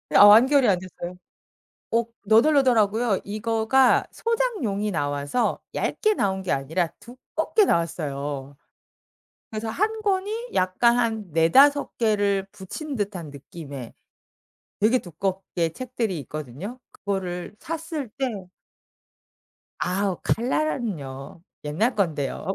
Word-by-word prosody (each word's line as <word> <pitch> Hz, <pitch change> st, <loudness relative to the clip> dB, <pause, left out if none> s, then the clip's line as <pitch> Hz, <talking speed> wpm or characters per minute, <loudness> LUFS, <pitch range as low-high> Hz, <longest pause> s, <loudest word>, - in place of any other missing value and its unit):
아 -, -, +10 dB
완결이 250 Hz, +6 st, +7 dB
안 185 Hz, -3 st, +3 dB
됐어요. 180 Hz, -1 st, -8 dB, 0.8 s
어 230 Hz, 0 st, +3 dB, 0.2 s
너덜너덜하고요. 230 Hz, -4 st, +4 dB
이거가 225 Hz, +5 st, +2 dB
소장용이 410 Hz, -, -1 dB
나와서 145 Hz, +6 st, -1 dB
얇게 430 Hz, -1 st, +1 dB
나온 190 Hz, -, 0 dB
게 185 Hz, -, -1 dB
아니라 160 Hz, +6 st, 0 dB
두껍게 315 Hz, -, 0 dB
나왔어요. 145 Hz, -, -2 dB, 0.9 s
그래서 220 Hz, +1 st, -4 dB
1 435 Hz, -, -1 dB
권이 420 Hz, +4 st, -1 dB
약간 235 Hz, +6 st, +3 dB
한 220 Hz, -6 st, -1 dB
4-5 270 Hz, -, +4 dB
개를 205 Hz, -3 st, +1 dB
붙인 260 Hz, -, -6 dB
듯한 190 Hz, -7 st, -4 dB
느낌의 140 Hz, -3 st, -9 dB, 0.9 s
되게 230 Hz, +5 st, +4 dB
두껍게 180 Hz, -2 st, -3 dB
책들이 235 Hz, -7 st, -3 dB
있거든요. 155 Hz, -, -7 dB
그거를 185 Hz, -2 st, -4 dB
샀을 325 Hz, -4 st, -4 dB
때 220 Hz, -9 st, -3 dB, 1.3 s
아우 190 Hz, 0 st, -1 dB
칼라라는요. 210 Hz, -, -2 dB, 0.2 s
옛날 200 Hz, -, 0 dB
건데요. 160 Hz, -9 st, -1 dB
205 Hz, 235 characters per minute, -24 LUFS, 175-255 Hz, 1.3 s, 아